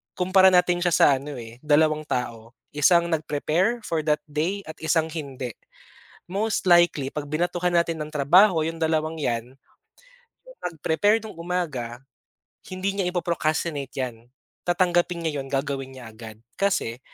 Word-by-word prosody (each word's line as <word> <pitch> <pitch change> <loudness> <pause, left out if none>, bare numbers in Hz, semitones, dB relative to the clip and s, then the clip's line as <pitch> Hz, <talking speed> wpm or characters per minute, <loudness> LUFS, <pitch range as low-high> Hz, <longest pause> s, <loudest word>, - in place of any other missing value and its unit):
kumpara 185 +1 +5
natin 180 -1 +4
siya 175 0 +1
sa - - +6
ano, 145 +1 -7
eh, 115 0 -10
dalawang 155 +1 +2
tao, 115 -1 -4 0.2
isang 170 +3 +3
nag-prepare, 165 +9 0
for 165 -5 -1
that 150 0 +1
day, 160 +7 -2
at 160 -2 -9
isang 160 0 +1
hindi. 135 -6 -5 0.8
Most 205 +4 -1
likely, 175 -6 +4
'pag 145 -1 -5
binatuhan 175 +3 0
natin 170 -1 +1
ng 150 - -4
trabaho, 160 +4 +4
yung 165 +1 -4
dalawang 160 0 0
yan, 120 -2 -2 0.9
yung - - -16
nag-prepare 180 +7 +1
no'ng 215 -6 -9
umaga, 150 -9 -3 0.6
hindi 195 +2 -3
niya 185 - +1
ipo-procrastinate 165 -5 -2
yan, 120 -3 -5 0.4
tatanggapin 175 -1 +1
niya 150 -3 -2
'yon, 135 - -6
gagawin 135 -1 -3
niya 120 -4 -10
agad. 110 -1 -10 0.2
Kasi, 130 -12 0
160 Hz, 145 wpm, -24 LUFS, 140-175 Hz, 0.9 s, sa